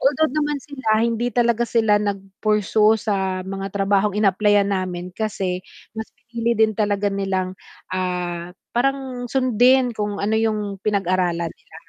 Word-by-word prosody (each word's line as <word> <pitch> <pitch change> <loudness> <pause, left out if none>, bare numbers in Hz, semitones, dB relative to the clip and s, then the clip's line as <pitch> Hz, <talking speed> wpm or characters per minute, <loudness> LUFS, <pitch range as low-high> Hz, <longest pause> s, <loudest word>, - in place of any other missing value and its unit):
Although 295 +2 +2
naman 295 -1 0
sila 245 -6 0
hindi 235 +1 0
talaga 235 -1 +2
sila 220 -3 +3
nag-pursue 210 +2 +1
sa 190 -3 -1
mga 195 +1 -4
trabahong 200 +1 +2
inapplyan 205 0 +3
namin 180 -1 -3
kasi 190 -4 -2 0.3
mas 220 0 -6
pinili 235 0 -2
din 220 0 +4
talaga 205 -1 0
nilang, 190 -2 -1 0.4
ah, 180 -1 -3 0.2
parang 260 0 -1
sundin 255 0 +3
kung 210 -2 -3
ano 215 +2 +1
'yung 210 -3 -1
pinag-aralan 185 -4 0
nila. - - -24
210 Hz, 130 wpm, -22 LUFS, 190-230 Hz, 0.4 s, din